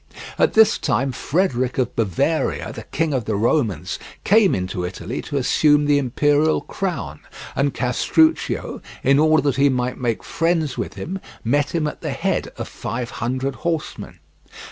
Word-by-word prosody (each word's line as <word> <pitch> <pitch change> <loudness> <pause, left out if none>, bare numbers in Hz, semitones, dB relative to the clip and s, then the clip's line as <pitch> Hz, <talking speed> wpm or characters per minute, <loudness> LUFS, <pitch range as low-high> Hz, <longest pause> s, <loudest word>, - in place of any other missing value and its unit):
At - - +3
this 220 0 +5
time 130 +5 0
Frederick 130 -3 0
of 125 -2 -1
Bavaria, 100 -6 0
the - - -8
King 160 -1 -1
of 125 -5 -1
the 110 - -1
Romans, 105 - 0 0.2
came 210 -1 +4
into 90 -1 -3
Italy 90 +1 -5
to 145 - -4
assume 150 +3 +3
the 145 0 +4
Imperial 145 +4 +2
crown, 125 - -4 0.4
and 140 +1 +1
Castruccio, 315 - +1 0.2
in 140 +1 +4
order 155 -1 +4
that 140 -3 +1
he 140 +1 +4
might 125 -1 -1
make 120 -3 -1
friends 165 -4 0
with - - -4
him, 190 +4 -5 0.2
met 145 +7 +1
him 160 -2 +1
at 150 - -4
the - - -3
head - - -1
of - - -5
five 120 0 -5
hundred 130 +3 -2
horsemen. 165 -3 -4
140 Hz, 160 wpm, -21 LUFS, 120-155 Hz, 0.4 s, this